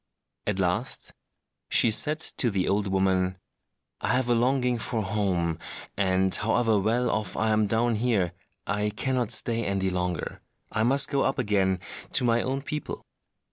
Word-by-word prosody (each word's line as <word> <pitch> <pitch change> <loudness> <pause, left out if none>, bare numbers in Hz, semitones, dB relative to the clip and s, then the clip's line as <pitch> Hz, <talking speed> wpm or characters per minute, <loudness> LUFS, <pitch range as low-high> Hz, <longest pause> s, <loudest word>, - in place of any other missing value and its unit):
At 105 -2 0
last 95 +6 -2 0.6
she 115 - +4
said 150 +8 +4 0.2
to 120 - +3
the 95 -3 -1
old 100 +1 +1
woman, 95 -1 +1 0.6
"I - - -3
have 125 -1 0
a - - +4
longing 125 0 +1
for 110 -1 -1
home; 95 -5 -1 0.4
and 95 -1 +2
however 110 +1 +2
well 115 +5 +1
off 105 -4 -2
I 110 +1 +1
am 110 -1 +2
down 115 +3 +1
here, 105 -7 0 0.3
I 105 +1 0
cannot 125 +2 -1
stay 115 0 +1
any 95 -2 -1
longer; 90 -2 -3 0.3
I 110 - -1
must 135 +5 +3
go 140 -2 +1
up - - 0
again 95 -6 +1 0.3
to - - +5
my 120 -1 +3
own 135 +1 -2
people." 150 0 -5
110 Hz, 160 wpm, -26 LUFS, 95-120 Hz, 0.6 s, to